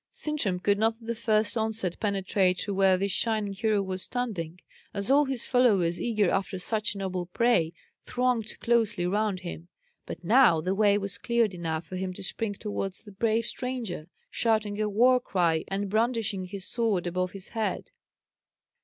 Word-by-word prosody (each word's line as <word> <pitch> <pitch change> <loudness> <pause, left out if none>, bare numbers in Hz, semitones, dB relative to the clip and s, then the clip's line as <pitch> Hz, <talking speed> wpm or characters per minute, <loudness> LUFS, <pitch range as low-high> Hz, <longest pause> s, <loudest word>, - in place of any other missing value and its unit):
Sintram 265 -12 0
could 200 +2 +1
not 225 +1 +2
at 230 - -15
the 235 - -1
first 220 -2 +1
onset 220 -5 -1
penetrate 195 -2 +1
to 200 - -2
where 190 -1 +4
this 200 +1 -1
shining 215 -1 0
hero 210 0 +1
was 190 -1 -4
standing, 185 -10 -3 0.4
as 200 +5 0
all 290 +2 +5
his 265 -3 -3
followers, 200 -10 +2
eager 215 -6 +1
after 195 0 -1
such 210 +3 -1
a - - -6
noble 185 -2 -3
prey, 180 -5 +2 0.3
thronged 245 -3 -1
closely 220 -6 +1
round 200 0 0
him; 175 -2 -7 0.4
but - - -7
now 220 -3 +5
the 180 +4 -1
way 205 0 +4
was 200 -1 -2
cleared 235 -4 +1
enough 165 -2 -3
for 185 - -6
him 185 0 -3
to - - -9
spring 205 +2 -3
towards 195 -2 -4
the 210 - -12
brave 220 +3 0
stranger, 235 -12 -4 0.2
shouting 215 -2 0
a 210 - 0
war 250 +5 +4
cry, 170 -8 +1
and 200 +1 -2
brandishing 220 -2 0
his 190 +1 -7
sword 220 -7 0
above 180 +1 -2
his 195 -1 -7
head. 225 -2 -3
205 Hz, 175 wpm, -27 LUFS, 185-225 Hz, 0.4 s, all